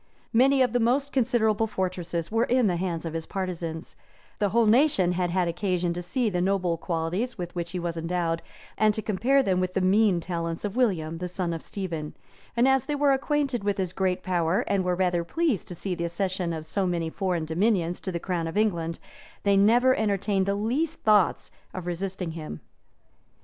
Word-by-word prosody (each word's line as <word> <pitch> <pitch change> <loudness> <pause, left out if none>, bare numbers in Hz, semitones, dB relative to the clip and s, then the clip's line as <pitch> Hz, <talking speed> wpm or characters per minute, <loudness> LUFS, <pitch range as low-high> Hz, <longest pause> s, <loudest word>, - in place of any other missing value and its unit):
* - - -37
Many 270 0 +4
of 245 -2 0
the 245 - +3
most 265 +5 +1
considerable 225 -4 +2
fortresses 180 -4 -3
were 225 +2 +2
in 250 0 +2
the 180 -4 +1
hands 170 -2 -3
of 165 - -4
his 165 -1 -4
partisans; 170 -4 -4 0.4
the 205 - +2
whole 230 +3 +3
nation 220 - +4
had 180 0 0
had 180 0 +1
occasion 175 0 -1
to 175 - -4
see 230 +8 -1
the 180 -4 0
noble 185 -2 +1
qualities 170 +9 -2
with 175 -2 -5
which 170 -1 -3
he 180 - -4
was 170 -1 -3
endowed, 165 0 -1 0.4
and 215 0 +4
to 220 - -3
compare 245 +8 +2
them 185 -5 +1
with 185 0 -2
the - - +3
mean 190 0 +3
talents 170 +1 -3
of 205 +1 -4
William, 165 -10 0
the 180 - -3
son 180 -1 -2
of 165 - -5
Stephen; 165 -6 -5 0.4
and 240 +2 +5
as 265 -2 +2
they 295 - 0
were 285 -1 +3
acquainted 275 -4 0
with 205 -1 0
his 185 -2 -2
great 185 -1 0
power, 175 +2 +1
and 200 -5 0
were 180 0 +1
rather 180 -2 +1
pleased 300 - -1
to 175 - -6
see 185 +2 -3
the 170 -1 -2
accession 180 0 -2
of 160 -1 -5
so 190 +4 -1
many 170 -2 -1
foreign 180 -4 -1
dominions 175 +1 +1
to 190 - -3
the 170 - -3
crown 170 -2 -2
of 165 - -4
England, 170 -6 0 0.5
they 200 -1 +3
never 235 +6 +5
entertained 200 -2 0
the 200 - +1
least 270 +11 -1
thoughts 210 -4 +3 0.2
of 185 -2 -5
resisting 180 0 -3
him. 155 - -7
185 Hz, 205 wpm, -26 LUFS, 170-220 Hz, 0.5 s, and